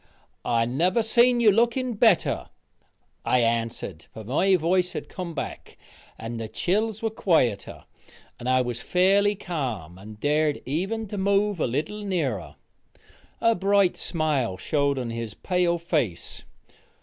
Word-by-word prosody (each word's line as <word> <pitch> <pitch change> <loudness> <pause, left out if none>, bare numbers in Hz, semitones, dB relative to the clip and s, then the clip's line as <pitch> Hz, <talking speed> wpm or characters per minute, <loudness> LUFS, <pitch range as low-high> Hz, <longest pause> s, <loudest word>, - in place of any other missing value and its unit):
"I 115 -1 +1
never 175 - +1
see 235 +3 +4
you 240 -3 +4
looking 235 +4 +1
better," 215 -4 +2 0.8
I 125 - +2
answered, 115 0 -2
for 110 - -9
my 170 - +2
voice 180 +2 +1
had - - -5
came 175 -3 -6
back, - - -6 0.4
and 115 +1 -6
the 110 - -4
chills 215 - -1
were 225 - 0
quieter, 145 - 0 0.6
and 125 - -3
I 130 0 +4
was 120 -1 -4
fairly 200 +3 +3
ca'm 125 - -5
and 105 +2 -11
dared 150 +2 +1
even 195 - -2
to 205 - -4
move 200 0 +1
a - - +1
little 155 - -3
nearer. 155 - -2 0.9
A 230 - +4
bright 195 -2 +2
smile 145 - -1
showed 140 +2 0
on 125 -3 -3
his 115 -2 -5
pale 180 -2 0
face. 150 - -3
170 Hz, 140 wpm, -25 LUFS, 120-200 Hz, 0.9 s, see